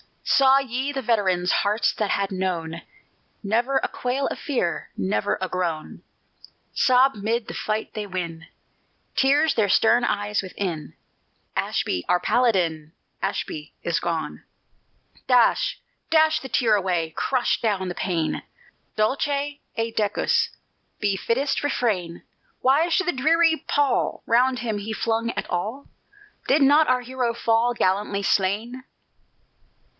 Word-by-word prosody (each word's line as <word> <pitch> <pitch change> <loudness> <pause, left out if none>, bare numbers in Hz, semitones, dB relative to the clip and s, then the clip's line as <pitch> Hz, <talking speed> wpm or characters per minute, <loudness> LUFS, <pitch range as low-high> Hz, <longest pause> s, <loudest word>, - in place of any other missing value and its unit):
_" - - +2
Saw 270 0 +6
ye 265 +1 -2
the 275 -1 -3
veterans 190 -6 +1
Hearts 205 +1 +1
that 210 -2 -2
had 200 0 0
known 170 -3 -3 0.6
Never 235 +6 +1
a - - 0
quail 255 +3 -2
of - - -5
fear, 240 - -2
Never 95 +2 0
a 185 - -2
groan, 175 -4 -3 0.7
Sob 260 +1 +4
'mid 225 +3 -2
the - - -6
fight 215 0 -3
they 210 -2 -4
win, 170 -4 -5 0.7
Tears 290 +3 +3
their 210 -3 +1
stern 240 +5 +4
eyes 205 -2 0
within, 180 -5 -5 0.6
"Ashby, 90 - -1
our 180 - +4
Paladin, 175 -9 +1 0.3
Ashby 150 0 -4
is 170 -2 0
gone!" 165 -2 -3 0.8
Dash 255 - +3 0.3
dash 315 -1 +4
the 265 - -9
tear 225 -3 +3
away, 175 -5 -1
Crush 255 -2 0
down 200 -5 0
the 180 - -3
pain! 170 -4 -2 0.5
"Dulce 215 +7 +1
et 285 -5 -4
decus" 210 -1 +1 0.5
be 200 -2 +1
Fittest 270 +8 0
refrain! 200 -12 -1 0.4
Why 285 +6 +3
should 375 +2 +1
the 355 - +2
dreary 320 +4 +2
pall 285 -3 +1
Round 250 +2 +3
him 225 -3 -2
be 210 +2 -4
flung 230 +1 -1
at - - -4
all? 215 +10 -3 0.6
Did 280 +2 +4
not 295 +3 +5
our 255 0 +2
hero 245 -1 -2
fall 235 +1 +1
Gallantly 200 0 0
slain? 215 +7 0
225 Hz, 135 wpm, -24 LUFS, 185-260 Hz, 0.8 s, Saw